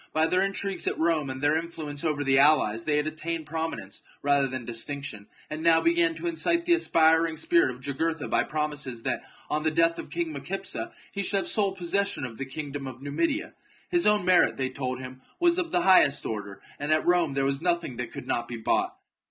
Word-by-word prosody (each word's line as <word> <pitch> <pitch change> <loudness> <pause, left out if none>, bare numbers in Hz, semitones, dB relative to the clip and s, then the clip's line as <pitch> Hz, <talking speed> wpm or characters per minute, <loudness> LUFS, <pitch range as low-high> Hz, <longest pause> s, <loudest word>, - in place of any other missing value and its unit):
By 155 0 +3
their 180 +3 +2
intrigues 195 0 -2
at - - 0
Rome, 160 -4 +1
and 130 +1 -6
their 145 +1 +3
influence 160 -3 -4
over 150 -3 0
the 135 -1 +4
allies, 135 -7 +4
they 150 -1 +2
had 150 - +1
attained 160 +1 -4
prominence 160 -10 -5 0.2
rather 140 -1 +3
than 130 -2 -5
distinction, 115 -2 -5 0.2
and 155 +1 -6
now 165 0 +5
began 340 0 +2
to 350 - -7
incite 340 0 0
the 350 - +4
aspiring 160 - +3
spirit 170 -1 +3
of 125 0 -8
Jugurtha 155 +3 -2
by - - +2
promises 150 -6 -3
that, - - -1 0.3
on 150 - -1
the 155 - +2
death 165 +1 +2
of - - -7
King 335 -2 -2
Micipsa, - - -5 0.2
he 200 - -3
should 200 +1 +1
have 195 - -1
sole 200 -3 +2
possession 195 -3 -1
of 115 -3 -9
the 135 - -3
kingdom 140 0 -6
of 130 -1 -8
Numidia. 275 - -2 0.4
His 345 -1 +2
own 210 -3 +3
merit, 185 -1 +4
they 130 -1 0
told 130 -1 -4
him, 130 0 -9 0.2
was 345 0 +3
of 340 -2 -2
the 175 - +1
highest 175 -6 +5
order, 100 -2 -5 0.2
and 145 +2 -2
at 155 0 +2
Rome 175 -5 +2
there 135 0 +1
was 135 +1 -1
nothing 170 -7 -1
that 125 - -4
could - - -8
not 120 0 -1
be 120 - -6
bought. 110 - 0
155 Hz, 215 wpm, -27 LUFS, 135-175 Hz, 0.4 s, now